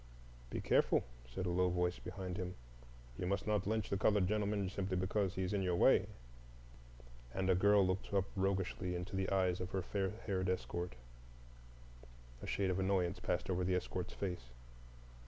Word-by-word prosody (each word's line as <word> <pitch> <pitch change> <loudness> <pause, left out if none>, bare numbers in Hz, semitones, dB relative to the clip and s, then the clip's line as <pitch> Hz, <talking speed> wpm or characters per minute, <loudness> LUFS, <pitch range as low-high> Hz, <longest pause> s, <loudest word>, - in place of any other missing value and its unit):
"Be - - -3
careful," - - +3 0.3
said 75 +10 -3
a 90 - 0
low 90 +1 +3
voice 90 0 0
behind 95 0 -5
him; 90 -1 -4 0.6
"you 90 - -1
must 100 +2 0
not 105 -2 +1
lynch 110 -1 0
the 100 - +2
colored 100 -1 +3
gentleman 105 -1 0
simply 95 0 -2
because 95 +1 0
he's 95 +1 -1
in 100 - +1
your 90 -2 +1
way," - - +5 1.3
and 95 0 +2
a - - +6
girl 100 +2 +5
looked 95 +1 -1
up 100 -2 +2
roguishly 95 -1 0
into 90 +3 -4
the 95 0 0
eyes 95 -2 +2
of 90 - -3
her 95 -1 -2
fair 95 0 -1 0.2
haired 95 -2 0
escort. 90 -2 -2 1.5
A - - -6
shade 95 -2 +1
of 90 - -1
annoyance 95 -1 +1
passed 90 -1 -1
over 90 -1 0
the 90 0 +2
escort's 90 0 -3
face. 90 -10 -3
95 Hz, 175 wpm, -37 LUFS, 90-100 Hz, 1.5 s, a